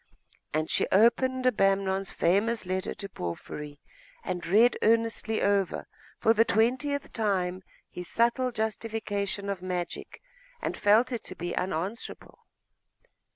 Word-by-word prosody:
And 155 +1 0
she - - +1
opened 255 +5 +3
Abamnon's 195 -4 +2
famous 205 +6 +1
letter 185 +1 -2
to 200 - -6
Porphyry, 145 - -6 0.4
and 180 -1 -3
read 225 +7 +5
earnestly 225 0 +1
over, 200 -2 +1 0.3
for 225 - +4
the 225 0 +5
twentieth 255 +7 0
time, 190 -4 0 0.3
his 180 -1 -7
subtle 240 +2 +2
justification 215 -3 -3
of 200 -2 -3
magic, 180 -2 -4 0.4
and - - -3
felt 220 +5 +4
it 235 -3 -3
to - - -6
be 175 +1 -4
unanswerable. 185 +5 -4
205 Hz, 120 wpm, -28 LUFS, 185-230 Hz, 0.4 s, read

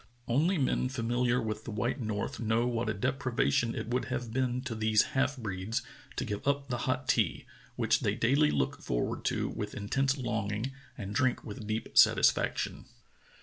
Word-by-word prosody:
Only 160 +10 +2
men 130 -2 +1
familiar 120 0 +1
with 110 -2 -3
the - - -7
white 120 +5 -1
north 110 +4 -3
know 115 +1 +1
what 120 -2 -1
a - - +1
deprivation 120 - +1
it - - -4
would 125 +1 0
have 120 -2 -4
been 125 -1 0
to 130 -2 -4
these 110 -1 +3
half 135 +1 +1
breeds 100 -1 -3 0.3
to - - -2
give 105 +5 -4
up 140 -1 +1
the 125 - -1
hot 130 0 -1
tea, 110 -10 +1 0.3
which - - +2
they - - 0
daily 140 +6 +3
look 70 -2 -1
forward - - -2
to - - 0
with 105 0 -5
intense 135 +7 0
longing 110 -1 -2 0.3
and 100 -3 -5
drink 130 +2 +1
with 105 -1 -7
deep 110 +1 -3
satisfaction. - - +4
120 Hz, 175 wpm, -31 LUFS, 110-130 Hz, 0.3 s, satisfaction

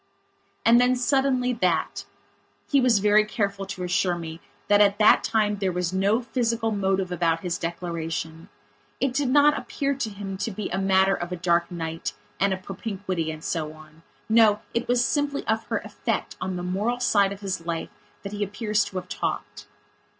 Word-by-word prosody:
And 235 +1 +7
then, 250 +1 +3
suddenly, 255 0 +1
that 180 -8 0 0.6
He 280 -2 +3
was 245 -4 +4
very 210 +1 +4
careful 200 -2 -2
to 190 -2 -5
assure 180 0 +1
me 165 -1 -7 0.3
that 205 0 +5
at 200 0 +4
that 215 - +6
time 210 -2 +1
there 195 -2 0
was 180 0 -2
no 200 +6 +2
physical 230 -2 0
motive 195 -2 0
about 165 -2 +1
his 180 -1 -2
declaration. 165 -1 -4 0.5
It 270 -2 0
did 275 -1 0
not 290 +2 +5
appear 280 0 -2
to 260 -5 -3
him 200 -1 -6
to 205 +3 -2
be 210 -1 -5
a 190 - -1
matter 190 0 +3
of 175 -1 -4
a - - -1
dark 170 -1 +1
night 165 -2 -4 0.3
and 200 0 +3
a 190 - 0
propinquity 190 -3 -4
and 155 0 -7
so 155 -3 -2
on. 155 +1 -16 0.3
No, 220 -2 +5
it 235 - -1
was 245 0 +3
simply 290 -1 -1
of 220 0 0
her - - 0
effect - - -3
on 185 - -2
the 175 - -4
moral 205 +7 -1
side 200 -5 +3
of 200 0 -7
his 185 -4 -4
life 165 -1 -3 0.3
that 200 - -6
he 205 0 -2
appears 210 +1 0
to - - -10
have 180 -1 -4
talked. - - -4
195 Hz, 185 wpm, -25 LUFS, 180-225 Hz, 0.6 s, And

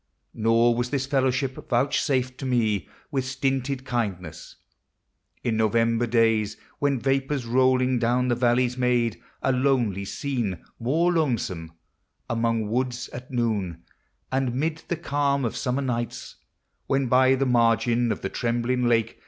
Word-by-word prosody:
Nor 115 +2 +3
was 120 +1 -1
this 135 -1 -1
fellowship 130 -1 +1 0.2
vouchsafed 130 0 +1
to - - -5
me 110 -6 0 0.2
With 135 -3 0
stinted 135 0 -2
kindness. 100 - -4 0.9
In 115 -2 0
November 115 +2 +2
days, 110 -2 +2 0.2
When 140 -3 +1
vapors 135 0 0
rolling 130 +1 +3
down 120 +2 +1
the 120 - +2
valleys 120 +1 +1
made 120 -3 +1 0.2
A 135 - +3
lonely 125 -7 +1
scene 115 - -3
more 160 +9 +2
lonesome; 105 - -1 0.5
among 115 -2 0
woods 125 +2 -2
At 125 +1 -9
noon; 105 -9 -2 0.5
and 130 -2 0
'mid 160 +4 -1
the 170 - -2
calm 140 -4 0
of 115 - -2
summer 130 +3 -1
nights, 120 -1 -4 0.5
When, 135 0 +1
by 130 +2 +4
the 135 +1 0
margin 120 -1 +2
of - - -3
the 95 - -3
trembling 120 +2 0
lake. 115 -1 +1
125 Hz, 135 wpm, -25 LUFS, 115-135 Hz, 0.9 s, by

